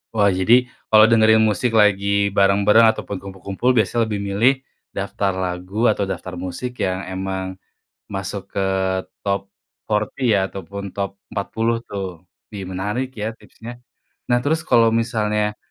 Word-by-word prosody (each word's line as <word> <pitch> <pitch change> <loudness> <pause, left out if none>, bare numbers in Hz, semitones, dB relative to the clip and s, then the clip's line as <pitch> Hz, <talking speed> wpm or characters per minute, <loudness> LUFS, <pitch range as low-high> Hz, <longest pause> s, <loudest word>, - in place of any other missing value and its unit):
Wah 105 -2 +4
jadi 95 +5 +4 0.4
kalo 110 0 +8
dengerin 110 -1 +5
musik 110 +4 0
lagi 100 -1 +3 0.3
bareng-bareng 100 +3 +5
ataupun 105 -2 -6
kumpul-kumpul 95 +5 -3
biasanya 115 +1 +2
lebih 105 -2 -3
milih 115 +7 +4 0.4
daftar 100 0 -2
lagu 90 +6 -1
atau 100 - -1
daftar 90 -1 -6
musik 95 +8 -5
yang 95 0 0
emang 95 0 -3 0.7
masuk 95 0 -5
ke 100 - +1 0.6
top 100 -1 -2 0.3
40 110 +3 0
ya? 100 - +4
Ataupun 100 +1 -7
top 100 -1 -1 0.2
40 115 +3 -1
tuh, 100 -1 -4 0.5
ih 100 -2 -6
menarik 105 +8 -2
ya 105 - -1
tipsnya. 115 0 -11 0.6
Nah 120 - +5
terus 160 +2 +1
kalo 115 -1 +6 0.2
misalnya 105 -3 -1
100 Hz, 140 wpm, -21 LUFS, 95-110 Hz, 0.7 s, kalo